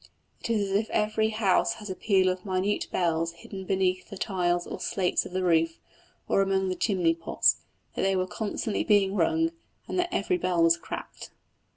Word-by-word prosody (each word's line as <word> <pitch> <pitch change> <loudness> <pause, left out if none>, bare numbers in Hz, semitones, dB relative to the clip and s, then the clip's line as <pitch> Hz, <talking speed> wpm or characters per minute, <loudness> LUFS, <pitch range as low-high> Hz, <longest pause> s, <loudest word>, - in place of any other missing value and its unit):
It - - -6
is 205 -4 0
as - - 0
if 215 +2 +1
every 215 +1 +1
house 215 -4 +2
had 210 -1 -9
a - - -4
peal 190 -2 +2
of 185 0 -3
minute 190 +1 -1
bells 165 -1 0
hidden 190 +3 -9
beneath 185 -1 0
the 200 - -8
tiles 175 -3 0
or - - -6
slates 185 -2 0
of - - -14
the 185 0 -1
roof, 165 -2 +2 0.5
or 195 - +3
among 190 -1 +1
the 185 - -1
chimney 180 -6 +1
pots, 165 0 +2 0.4
that - - -3
they 195 0 +2
were 185 0 +1
constantly 215 +2 -3
being 200 -2 +3
rung, 325 +5 +2 0.4
and - - -2
that 355 0 +1
every 365 -2 0
bell 175 - +1
was 165 0 +6
cracked. 170 - -8
190 Hz, 195 wpm, -27 LUFS, 180-210 Hz, 0.5 s, was